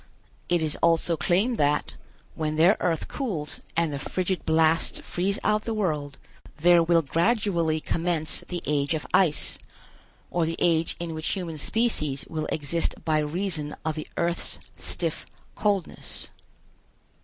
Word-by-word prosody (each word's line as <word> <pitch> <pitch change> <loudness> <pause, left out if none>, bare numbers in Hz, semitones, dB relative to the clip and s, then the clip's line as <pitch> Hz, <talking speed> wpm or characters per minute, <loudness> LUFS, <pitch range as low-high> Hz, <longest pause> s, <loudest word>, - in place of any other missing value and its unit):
It 175 -2 +2
is 155 -1 0
also 170 0 +3
claimed 195 +9 +2
that, 145 0 +1 0.4
when 155 -1 -2
their 170 +7 +5
earth 165 -3 0
cools 185 - -4 0.2
and 165 -3 +2
the 140 - -3
frigid 185 +4 -2
blasts 160 0 +3
freeze 195 +3 -1
out 215 0 +1
the 225 - -2
world, 150 -9 -1 0.4
there 175 +2 +6
will 165 0 +3
gradually 170 - +1
commence 165 -1 -1
the 175 -1 -4
Age 145 +1 +1
of 155 - -4
Ice, 170 -6 +3 0.7
or 170 -2 +1
the 165 - -2
age 165 -1 +2
in 170 -1 -4
which 155 0 -4
human 170 -5 -2
species 155 - 0
will 155 -1 -3
exist 160 +2 0
by 155 -1 +2
reason 155 -1 -1
of 160 - 0
the 155 0 -6
earth's 170 0 0 0.2
stiff - - -2 0.3
coldness. 200 -4 -1
165 Hz, 145 wpm, -26 LUFS, 155-180 Hz, 0.7 s, there